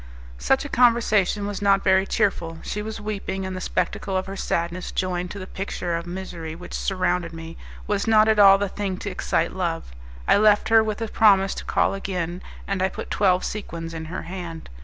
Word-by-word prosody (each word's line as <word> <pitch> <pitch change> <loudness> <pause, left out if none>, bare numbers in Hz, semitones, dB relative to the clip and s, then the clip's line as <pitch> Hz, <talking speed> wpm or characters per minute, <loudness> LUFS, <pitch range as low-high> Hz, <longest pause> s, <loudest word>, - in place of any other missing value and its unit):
Such 270 +2 +2
a - - -5
conversation 225 -5 +3
was 205 -1 -4
not 195 -1 +3
very 190 +1 +3
cheerful; 175 -6 0
she 210 - -3
was 220 +1 -6
weeping, 195 -2 -4
and 190 0 -4
the 185 - -5
spectacle 190 +1 -1
of 185 - -2
her 195 - -6
sadness, 170 -1 -2
joined 180 -1 -2
to 200 - -7
the 185 - -6
picture 185 -3 -4
of 170 +1 -4
misery 175 -3 -6
which 180 +2 -10
surrounded 180 -3 -1
me, 165 0 -8 0.3
was 205 0 -1
not 215 -1 +5
at 220 -1 +3
all 195 -1 +8
the 200 0 -1
thing 195 -1 -3
to 205 - -5
excite 185 - -1
love. 170 - -3 0.4
I - - +5
left 210 0 +4
her 225 0 +6
with 220 +1 -3
a - - -2
promise 195 -3 +4
to - - -7
call - - +1
again, 180 -3 -3 0.3
and 195 -2 -1
I 190 - +2
put - - -8
twelve 185 -3 +2
sequins 170 -5 -5
in 160 -1 -5
her 175 +4 -5
hand. 170 - -7
190 Hz, 205 wpm, -24 LUFS, 175-205 Hz, 0.4 s, all